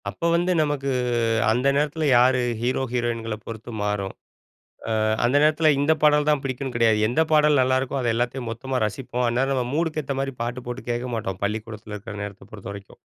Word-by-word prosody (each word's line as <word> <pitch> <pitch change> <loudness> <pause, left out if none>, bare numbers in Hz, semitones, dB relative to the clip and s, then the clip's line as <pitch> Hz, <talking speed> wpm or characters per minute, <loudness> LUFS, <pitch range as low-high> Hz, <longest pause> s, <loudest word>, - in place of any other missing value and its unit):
அப்ப 170 - -2
வந்து 175 +2 +1
நமக்கு 145 -2 -1 0.6
அந்த 125 +5 +2
நேரத்துல 150 +2 0
யாரு 130 +1 +4 0.2
ஹீரோ 125 +2 0
ஹீரோயின்கள 115 -2 -1
பொறுத்து 115 +1 -7
மாறும். 105 -2 -2 0.9
அ - - +2 0.2
அந்த 125 +4 +3
நேரத்துல 155 +1 +4
இந்த 145 +3 +3
பாடல்தான் 150 -1 +4
பிடிக்கும்னு 130 -1 -4
கிடையாது. 115 -2 +3
எந்த 125 +8 +2
பாடல் 150 -2 +5
நல்லாருக்கோ 130 +1 +1
அத 120 - -1
எல்லாத்தையும் 120 +1 -2
மொத்தமா 130 +3 -3
ரசிப்போம். 125 +2 -3
அந்நேரம் 130 +3 +1
நம்ம 125 -2 0
மூடுக்கு 155 -1 0
ஏத்த 135 0 -3
மாரி 135 -1 -3
பாட்டு 120 +2 -4
போட்டு 125 +2 -5
கேட்க 120 +1 -2
மாட்டோம், 95 -5 -3
பள்ளிக்கூடத்தில 105 0 -4
இருக்கற 105 0 -8
நேரத்த 100 -1 -9
பொறுத்த 100 -2 -8
வரைக்கும். 100 -1 -12
125 Hz, 175 wpm, -24 LUFS, 115-140 Hz, 0.9 s, பாடல்